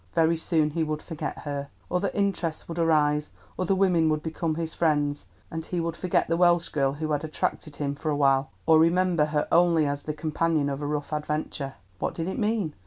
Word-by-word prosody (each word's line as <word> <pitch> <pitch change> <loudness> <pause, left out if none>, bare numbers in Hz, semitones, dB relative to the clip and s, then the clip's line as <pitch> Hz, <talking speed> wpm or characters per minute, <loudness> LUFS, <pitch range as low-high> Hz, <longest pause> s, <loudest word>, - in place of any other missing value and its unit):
Very 165 0 +4
soon 160 -2 +1
he 165 +1 0
would 155 -1 -3
forget 160 -3 -5
her. 140 -1 -4 0.2
Other 180 +2 +1
interests 190 -5 -1
would 170 0 -5
arise, 150 -2 +2 0.3
other 185 +1 +2
women 180 -4 +3
would 155 0 0
become 160 0 -2
his 160 0 -3
friends, 145 - 0 0.2
and 160 0 -4
he 175 +2 -3
would 165 0 -2
forget 180 0 0
the 165 - +1
Welsh 175 -1 +4
girl 135 -2 +1
who 155 +2 -3
had 145 0 0
attracted 155 -1 -3
him 140 -1 -2
for 150 +2 -4
a 150 - +1
while, 135 0 +3 0.2
or 160 -1 +6
remember 170 -1 +3
her 150 -1 -1
only 170 -2 +4
as 145 0 -1
the 150 - -4
companion 155 -1 0
of 140 +1 -4
a 145 - -2
rough 150 0 -3
adventure. 150 -2 -3 0.2
What - - -2
did 165 0 -3
it 190 - -3
mean? 210 -7 0
160 Hz, 210 wpm, -26 LUFS, 150-170 Hz, 0.3 s, or